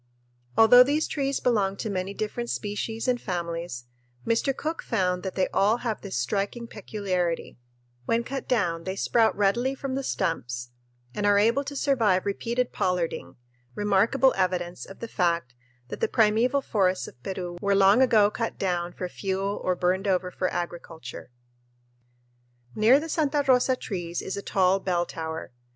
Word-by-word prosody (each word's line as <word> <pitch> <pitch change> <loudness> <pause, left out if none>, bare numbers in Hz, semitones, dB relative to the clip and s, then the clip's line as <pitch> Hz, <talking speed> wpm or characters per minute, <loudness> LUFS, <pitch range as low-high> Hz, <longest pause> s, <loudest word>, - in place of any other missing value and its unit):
Although 225 +2 +8
these 290 +5 +3
trees 275 -2 -1
belong 200 -5 +1
to - - -4
many 195 -1 -3
different 235 +2 -3
species 220 +3 -3
and 245 -1 +1
families, 170 - -4 0.4
Mr. 230 +4 +1
Cook 320 +2 -3
found 180 -5 0
that 190 0 -5
they 190 - +2
all 210 +4 +3
have 225 -2 -2
this 195 -10 -4
striking 200 - -2
peculiarity 185 - -3 0.5
when 230 - +1
cut 270 +3 -5
down 170 -9 0
they 190 - -3
sprout 225 +2 +2
readily 235 +7 +1
from 270 -1 -4
the 270 - -1
stumps 120 - -3 0.4
and 205 0 -1
are 205 0 +5
able 230 +7 +3
to 285 - -6
survive 230 -10 +2
repeated 235 +5 -1
pollarding; 180 -2 -2 0.4
remarkable 210 +6 +3
evidence 180 -2 -1
of 195 - -12
the 230 - -4
fact 170 - 0 0.4
that - - -6
the - - +2
primeval 235 +5 +2
forests 190 -5 +1
of 125 - -14
Peru 180 +1 -5
were 200 -1 +2
long 195 +5 +5
ago 215 -5 +5
cut 230 0 -3
down 175 -2 -1
for 180 - -4
fuel 195 +2 -3
or 185 - +1
burned 185 +3 0
over 180 -1 +1
for 185 - -2
agriculture. 170 -8 -6 1.4
Near 230 - +5
the 320 - -5
Santa 295 -2 +1
Rosa 255 0 +4
trees 175 -7 -4
is 190 - -4
a 200 - -4
tall 190 -1 +2
bell 175 -2 0
tower. 160 -4 -6
200 Hz, 160 wpm, -26 LUFS, 180-235 Hz, 1.4 s, Although